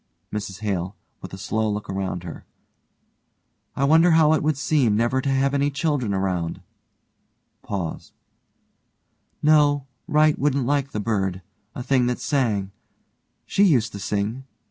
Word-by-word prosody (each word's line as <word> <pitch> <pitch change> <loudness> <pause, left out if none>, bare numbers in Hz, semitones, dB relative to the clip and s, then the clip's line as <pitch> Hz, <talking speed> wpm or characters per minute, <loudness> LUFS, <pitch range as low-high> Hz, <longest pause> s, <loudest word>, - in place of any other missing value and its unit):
MRS 100 -1 -5
HALE: 95 -2 -2 0.3
(with - - -8
a 95 - -7
slow 110 +3 -1
look 105 0 -3
around 95 -2 -3
her) 85 - -8 1.3
I 135 - -1
wonder 160 +5 +5
how 155 -1 +5
it 160 - +1
would 155 -1 0
seem 140 -7 +2
never 120 +4 +1
to 140 - -2
have 135 0 +2
had - - -10
any 145 - +2
children 140 -6 -1
around, 95 -4 -2 2.8
No, 145 -2 +4 0.2
Wright 155 0 +3
wouldn't 140 -2 +1
like 140 0 0
the 105 - -4
bird 95 -4 -1 0.3
a 125 - -5
thing 125 -1 +2
that 125 - -1
sang. 110 -9 0 0.7
She - - 0
used 130 - +3
to 100 - -7
sing. 105 +6 -2
125 Hz, 145 wpm, -23 LUFS, 100-145 Hz, 2.8 s, wonder